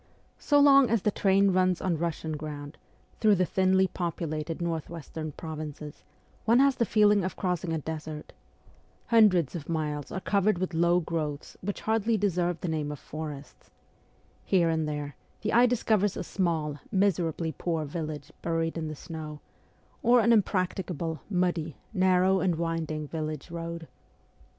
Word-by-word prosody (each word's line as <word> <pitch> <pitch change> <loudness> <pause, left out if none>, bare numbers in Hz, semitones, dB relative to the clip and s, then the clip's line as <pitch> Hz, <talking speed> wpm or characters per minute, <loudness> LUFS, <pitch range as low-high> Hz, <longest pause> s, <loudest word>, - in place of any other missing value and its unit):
So 290 -1 +3
long 275 -2 +7
as 225 -4 +1
the 210 - +2
train 195 0 +3
runs 185 -1 +2
on 170 -4 -1
Russian 160 -2 -2
ground, 150 -1 -7 0.4
through 215 -2 +5
the 185 -1 +2
thinly 190 +1 +3
populated 165 -3 -3
north 165 -2 -2
western 160 -1 -6
provinces, 155 -2 -7 0.4
one 230 +2 +4
has 275 0 +4
the 235 - +1
feeling 210 -2 +4
of 185 - -3
crossing 180 -2 -2
a 165 - 0
desert. 155 0 -6 0.8
Hundreds 205 - +5
of 155 -2 -6
miles 150 -3 -2
are 190 - -3
covered 200 +1 +2
with 180 0 -2
low 170 +2 +3
growths 155 -3 -4
which 200 +2 -4
hardly 220 0 +1
deserve 175 -4 0
the - - -3
name 155 -2 -2
of 150 - -6
forests. 150 -1 -8 0.7
Here 175 -3 +3
and 160 -1 0
there 145 -1 -5 0.3
the 215 - -1
eye 240 +2 +6
discovers 215 -4 +1
a - - -3
small, 160 -5 -1
miserably 170 -4 +1
poor 165 -3 -2
village 150 -1 -5
buried 165 0 -1
in 160 - -3
the 155 - -5
snow, 155 -1 -7 0.6
or 245 +1 +5
an 235 +1 +4
impracticable, 185 -5 0
muddy, 175 -5 -1 0.2
narrow, 185 0 +3
and 180 -3 +1
winding 160 -2 -2
village 155 0 -5
road. 170 -1 -5
170 Hz, 155 wpm, -28 LUFS, 155-190 Hz, 0.8 s, long